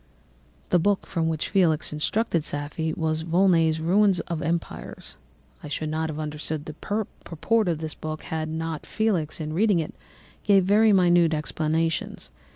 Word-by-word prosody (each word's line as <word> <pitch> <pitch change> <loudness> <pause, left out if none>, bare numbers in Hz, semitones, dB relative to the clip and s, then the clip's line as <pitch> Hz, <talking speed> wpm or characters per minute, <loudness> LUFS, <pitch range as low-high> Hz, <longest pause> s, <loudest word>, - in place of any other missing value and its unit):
"The 180 - +4
book 200 +3 +1
from 165 -1 -1
which 160 -1 -2
Felix 170 -7 +2
instructed 170 +2 0
Safie 150 +2 -3
was 160 -1 -1
Volney's 165 -2 +3
Ruins 190 +3 +3
of 165 -2 -4
Empires. 165 +2 -4 0.5
I - - -8
should 155 +1 -3
not 160 +1 -1
have 155 - -5
understood 150 0 -4
the 155 - -7
purport 210 +2 -2
of 170 -3 +1
this 155 -1 -4
book 155 0 -6
had 160 -1 -3
not 160 -1 -4
Felix, 185 -10 -1
in 155 -1 -4
reading 200 +2 +3
it, 160 -2 -2 0.5
given 195 -3 +4
very 215 +3 +5
minute 175 -4 +4
explanations. 160 +1 -2
160 Hz, 155 wpm, -25 LUFS, 155-185 Hz, 0.5 s, very